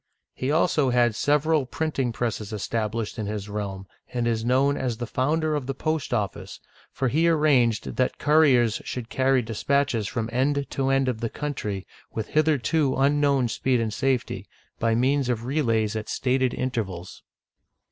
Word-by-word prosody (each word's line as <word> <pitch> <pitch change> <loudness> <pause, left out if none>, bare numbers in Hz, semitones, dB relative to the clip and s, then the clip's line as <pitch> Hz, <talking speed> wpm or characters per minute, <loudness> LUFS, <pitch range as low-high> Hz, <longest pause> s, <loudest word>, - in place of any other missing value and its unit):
He 130 - -3
also 155 -3 +2
had 120 -2 +3
sev 145 +5 +2
eral 155 -5 +1
printing 145 -6 -1
presses 110 -3 -3
established 110 +1 -3
in 105 - -3
his 105 -1 -4
realm, 100 -2 -5 0.3
and 120 -2 -1
is 115 -1 0
known 135 +4 +2
as 125 -5 -2
the 120 - -3
founder 155 +7 0
of 145 -4 -2
the 135 - -3
post 155 +1 -2
office, 105 -3 -3 0.3
for 130 - -1
he 160 +7 +2
arranged 140 -8 +2
that 130 - +1
cou 150 +1 +3
riers 120 -7 +3
should 120 -2 -5
carry 130 -1 +2
dispatches 115 0 0
from 110 +1 -2
end 140 +3 +1
to 135 -1 0
end 135 0 +2
of 125 -3 -1
the 115 - -1
coun 150 +4 -4
try, 100 -6 -4 0.3
with 110 -2 -3
hitherto 155 -1 +2
unknown 140 -2 +3
speed 125 +2 0
and 110 -2 -1
safety, 130 +1 -1 0.3
by 115 0 +2
means 130 +2 +1
of 115 -1 -1
relays 115 -6 0
at 110 0 -4
stated 130 -1 0
intervals. 95 -8 -4
125 Hz, 170 wpm, -25 LUFS, 115-140 Hz, 0.3 s, had